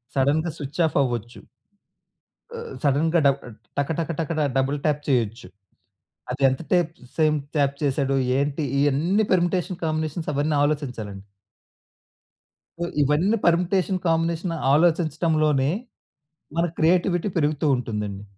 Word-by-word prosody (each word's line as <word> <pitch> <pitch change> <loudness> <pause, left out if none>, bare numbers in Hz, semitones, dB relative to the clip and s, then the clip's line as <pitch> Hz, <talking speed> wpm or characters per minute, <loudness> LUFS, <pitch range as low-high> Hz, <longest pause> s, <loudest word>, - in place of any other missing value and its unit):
సడెన్‌గా 145 +5 +2
switch 145 +4 -4
off - - -3
అవ్వచ్చు. 120 -2 -4 1.1
ఆహ్, 470 - -6
ఆహ్, - - -7
సడెన్‌గా 155 +4 +3
డ - - +8 0.5
టక 140 -1 0
టక 165 - -2
టక 160 - -2 0.3
డబుల్ 135 +2 +1
టాప్ 150 -1 +1
చేయొచ్చు. 115 -7 0 0.8
అది - - -4
ఎంత 130 0 -1
టేప్ 175 -3 +2 0.2
సేపు 155 -1 +3 0.2
టాప్ 140 -1 +2
చేశాడు, 140 -1 +1 0.2
ఏంటి 145 +2 -1 0.2
ఇవన్నీ 155 +9 +2
పెర్మిటేషన్ 180 0 0
కాంబినేషన్స్ 155 0 -2
అవన్నీ 145 +2 +1
ఆలోచించాలండి. 125 -10 -3 1.6
సో, 170 - -1 0.2
ఇవన్నీ 155 +10 +2
పెర్మిటేషన్ 180 +2 +2
కాంబినేషన్స్ 165 0 0
ఆలోచించడంలోనే, 155 -3 +2 0.9
మన 170 - +2
క్రియేటివిటీ 175 +3 +2
పెరుగుతూ 150 -1 +1
ఉంటుందండి. 105 -5 -4
155 Hz, 115 wpm, -24 LUFS, 140-170 Hz, 1.6 s, డ